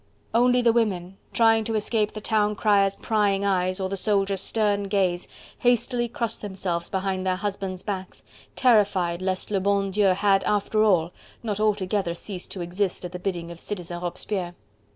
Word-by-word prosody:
Only 245 +1 +4
the 230 -1 +4
women, 195 -5 0
trying 225 -1 +4
to 225 0 -1
escape 215 0 0
the 215 - -6
town 210 -1 +1
crier's 200 -1 +3
prying 200 -3 +1
eyes, 185 -1 +1
or 190 - -1
the 195 - -3
soldiers' 195 -1 +1
stern 205 -1 0
gaze, 190 -3 0 0.3
hastily 245 0 +2
crossed 230 -1 -3
themselves 185 -4 -3
behind 190 -1 -2
their 185 -1 +1
husbands' 195 -1 -4
backs, 190 -3 -5 0.3
terrified 200 -8 +3
lest 185 +2 -2
le 200 - +2
bon 200 0 +1
Dieu 205 +1 +2
had, 195 0 +3
after 210 +1 +1
all, 175 -6 +3 0.3
not 210 -3 -2
altogether 200 -4 0
ceased 185 0 -6
to 190 - -5
exist 180 +2 -2
at 175 - -6
the 180 - -6
bidding 175 -3 -3
of 170 - -10
Citizen 175 -3 -5
Robespierre. 175 0 -4
195 Hz, 170 wpm, -25 LUFS, 185-210 Hz, 0.3 s, Only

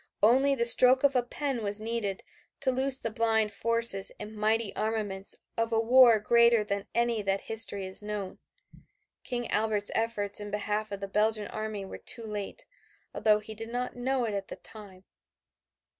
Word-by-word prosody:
Only 265 +5 +4
the 235 -3 0
stroke 255 +2 +6
of 280 -1 +3
a 250 - +4
pen 260 0 -3
was 205 0 -2
needed 215 -3 -3 0.4
to 265 -2 +2
loose 260 +1 +2
the 230 - -4
blind 220 -2 +1
forces 230 -3 +3
and 210 +1 -8
mighty 215 0 0
armaments 210 -3 -2 0.2
of 230 0 0
a 225 - +2
war 235 0 +6
greater 235 +1 +4
than 200 -1 -4
any 235 -2 +1
that 195 -1 -1
history 220 -3 +2
has 190 +2 -2
known. 210 -2 -6 0.8
King 240 -2 -3
Albert's 210 -1 +1
efforts 215 -3 -1
in 205 0 -7
behalf 210 +1 -2
of 200 -1 -6
the 200 - -4
Belgian 210 +1 0
army 215 -2 -5
were - - -9
too 230 -2 -3
late, 210 - -6 0.5
although 215 -1 +3
he 215 +1 -9
did 225 +1 -8
not 245 +1 -4
know 250 0 -1
it 215 - -3
at 195 -1 -4
the - - -8
time. 200 -4 -11
220 Hz, 175 wpm, -28 LUFS, 205-235 Hz, 0.8 s, stroke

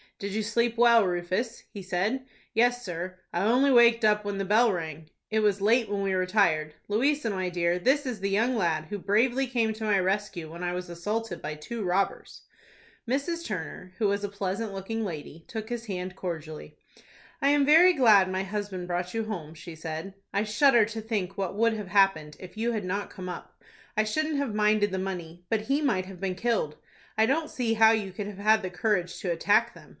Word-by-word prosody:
"Did 200 0 -5
you 215 +1 -1
sleep 235 +2 0
well, 235 -2 +6
Rufus?" 185 +6 -2
he 200 - -7
said. 195 +8 -1 0.3
"Yes, 245 +2 +2
sir. 180 +1 -5 0.2
I 175 - 0
only 255 +6 +4
waked 235 -2 +6
up 210 0 +3
when 205 -1 -3
the 195 - -2
bell 220 +4 +4
rang." 160 -3 -5 0.2
"It 220 - +2
was 205 -2 +2
late 225 +2 +3
when 200 -1 -1
we 195 -1 0
retired. 185 -5 +1
Louisa, 255 +4 +1
my 185 -2 -2
dear, 175 0 0
this 275 +9 +2
is 245 -5 -4
the 195 +1 -1
young 225 +6 +1
lad 165 -7 0
who 205 +6 -5
bravely 240 +7 +2
came 230 -3 0
to 220 +1 -8
my 210 -2 +2
rescue 190 -3 -2
when 170 +2 -8
I 175 0 -1
was 180 0 -5
assaulted 205 +3 -3
by 155 - -4
two 215 +9 -6
robbers." 190 +2 -2 0.7
Mrs. 335 +6 -1
Turner, 185 -1 -6
who 210 - +2
was 200 0 0
a 205 - -2
pleasant 200 +2 -3
looking 220 +4 -4
lady, 165 -3 -7
took 220 -1 -6
his 240 -1 -4
hand 185 -1 -4
cordially. 160 -4 -6 0.6
"I 280 - +3
am 290 -1 +4
very 330 +5 +7
glad 215 - +5
my 185 +1 -1
husband 195 -2 -4
brought 180 +2 -3
you 225 -1 -1
home," 165 -8 -6
she 165 +1 -10
said. 160 +3 -6 0.2
"I 200 +1 +1
shudder 230 +2 +4
to 220 +1 -6
think 205 -4 -3
what 195 -1 -3
would 230 +2 +2
have 210 -3 -5
happened, 175 -7 +2
if 185 +1 -11
you 235 +2 0
had 210 -4 -3
not 200 +3 -3
come 185 -1 -7
up. 180 - -9 0.3
I 215 - +4
shouldn't 310 +7 -1
have 280 -6 -1
minded 210 -1 +2
the 190 - -2
money; 175 -2 -6
but 220 -1 +1
he 275 +7 0
might 220 -11 +1
have 185 -1 -11
been 190 -1 -2
killed. 220 -8 -1 0.4
I 220 - +5
don't 305 +6 0
see 235 -3 -1
how 220 0 +6
you 210 -4 -1
could 200 +2 -5
have 205 -2 -8
had 215 +2 +3
the 185 - -4
courage 180 -1 -1
to 180 - -1
attack 185 +5 +2
them." - - -15
205 Hz, 210 wpm, -27 LUFS, 180-225 Hz, 0.7 s, very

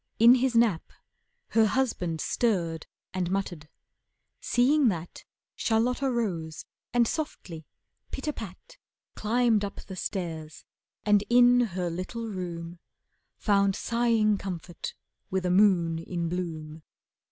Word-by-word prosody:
In 235 +2 +8
his 255 -1 +1
nap 225 -8 +2 0.6
Her 220 -1 +4
husband 205 -10 -1
stirred 170 -9 0 0.3
and 185 -2 -1
muttered. 180 -5 -3 0.7
Seeing 270 +3 +3
that, 175 -5 -3 0.3
Charlotta 245 +4 +1
rose 180 -10 -2 0.3
and 240 -1 +3
softly, 185 - -5 0.4
pit - - -6
a 300 - 0
pat, 235 - -10 0.4
Climbed 225 -1 +2
up 200 - -5
the 190 - -8
stairs, 165 -5 -5 0.4
and 205 -1 +4
in 245 0 +6 0.2
her 180 -2 -1
little 185 +7 -5
room 175 -4 -6 0.6
Found 200 -2 +2
sighing 230 -3 +2
comfort 175 -3 -6 0.3
with 190 -1 -1
a 180 - +1
moon 180 -4 +4
in 170 0 -3
bloom. 160 -3 -5
195 Hz, 120 wpm, -28 LUFS, 170-235 Hz, 0.7 s, In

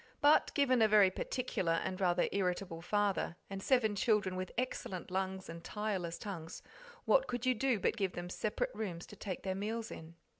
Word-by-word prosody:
But, 295 +1 +5
given 255 -4 +4
a 220 - +7
very 210 -3 +6
particular 190 -6 -1
and 185 +3 -2
rather 175 -1 +3
irritable 180 -3 -1
father, 205 -1 0 0.2
and 195 0 -4
seven 220 -3 +3
children 205 -3 +2
with 185 0 -4
excellent 195 -8 -3
lungs 190 0 -2
and 165 0 -8
tireless 195 -5 -2
tongues, 170 -6 -7 0.4
what - - +4
could 245 0 -3
you 255 - +4
do 250 -1 +1
but 230 - +1
give 195 -3 0
them 175 0 -5
separate 215 - -2
rooms 175 -6 -4
to - - -12
take 190 -4 -5
their 190 - -1
meals 220 +4 -3
in? 165 +1 -9
195 Hz, 185 wpm, -34 LUFS, 180-225 Hz, 0.4 s, a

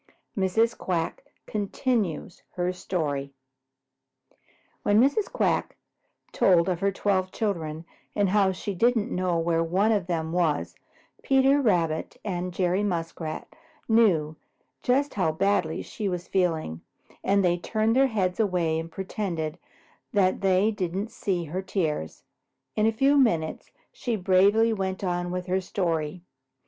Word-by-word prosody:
IV 195 - 0
MRS. 225 +1 +3
QUACK 170 -3 -2 0.2
CONTINUES 205 - -2
HER 180 0 0
STORY 145 -7 -3 1.5
When 205 +1 +3
Mrs. 285 - +2
Quack - - 0 0.5
told 175 -2 +4
of 180 -3 0
her 200 +1 +1
twelve 190 -1 0
children 165 -7 -3 0.3
and 200 -2 +2
how 195 -1 +3
she 195 +2 -4
didn't 230 +3 +2
know 180 -1 0
where 165 0 +1
one 190 +6 +2
of 200 -5 0
them 160 -2 -2
was, 150 - 0 0.5
Peter 270 +1 +4
Rabbit 170 - 0
and 180 -2 -2
Jerry 180 +2 +1
Muskrat 165 -4 -3 0.4
knew 185 -10 +3 0.5
just 275 +3 +1
how 180 -6 +1
badly 165 -1 0
she 210 -3 -4
was 180 -1 -4
feeling, 160 - 0 0.4
and 200 0 +3
they 175 0 +2
turned 220 +4 0
their 270 +1 +5
heads 190 -6 -1
away 175 -6 +1
and 165 0 -6
pretended 180 -4 -4 0.5
that 190 -3 +2
they 195 +2 +3
didn't 195 +1 -3
see 180 -4 -2
her 170 +4 -4
tears. 160 - -3 0.5
In 215 +1 +3
a - - +4
few 270 +6 +3
minutes 165 -12 +1 0.2
she 240 -3 -3
bravely 200 +4 +4
went 190 -2 -3
on 175 -1 -1
with 180 0 -3
her 185 +1 0
story. 170 -3 -2
185 Hz, 135 wpm, -26 LUFS, 170-210 Hz, 1.5 s, their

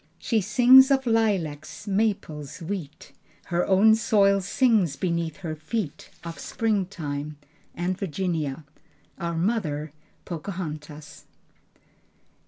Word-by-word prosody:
She 220 +5 0
sings 250 +6 +7
of 270 -1 +2
lilacs, 190 -10 -1
maples, 195 -9 -2
wheat, 165 -4 -6 0.3
Her 175 0 -1
own 200 +3 +6
soil 205 -3 +3
sings 200 - +2
beneath 170 -3 -2
her 165 -4 -5
feet, 155 +2 -4
Of 170 -1 -7
springtime 165 -9 -2 0.4
And 180 +2 -1
Virginia, 160 -5 -2 0.6
Our 170 -2 -3
Mother, 165 -6 -1 0.3
Pocahontas. 155 -4 -7
180 Hz, 95 wpm, -25 LUFS, 155-210 Hz, 0.6 s, sings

